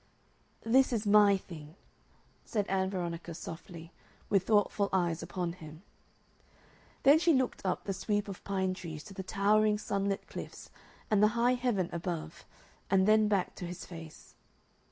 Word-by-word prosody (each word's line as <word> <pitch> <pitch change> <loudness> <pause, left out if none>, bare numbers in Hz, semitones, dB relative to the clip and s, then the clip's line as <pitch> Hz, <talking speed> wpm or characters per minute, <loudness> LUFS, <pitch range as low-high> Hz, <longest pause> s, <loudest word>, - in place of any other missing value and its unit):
"This 260 +4 +4
is 225 -3 -1
MY 205 -1 +6
thing," 160 -4 -11 0.7
said 210 -3 -1
Ann 190 0 +1
Veronica, 170 -3 -4
softly, 165 0 -9 0.4
with 195 -2 +2
thoughtful 205 -1 +2
eyes 175 -3 0
upon 175 -3 -3
him. 160 0 -12 1.2
Then 285 +3 +7
she 335 0 +4
looked 260 -2 0
up 185 -2 -1
the 195 - -2
sweep 205 +1 -1
of 195 -2 -8
pine 190 -1 -1
trees 160 -4 -7
to 200 - -11
the 190 - -5
towering 210 +2 +2
sunlit 200 -1 -2
cliffs - - -9 0.4
and 210 -1 +4
the 210 +2 +3
high 240 +2 +4
heaven 240 -8 0
above 165 -2 -5 0.4
and 190 0 +3
then 215 0 +5
back 200 -3 0
to 180 - -5
his 175 0 -7
face. 165 -3 -11
195 Hz, 155 wpm, -31 LUFS, 175-210 Hz, 1.2 s, Then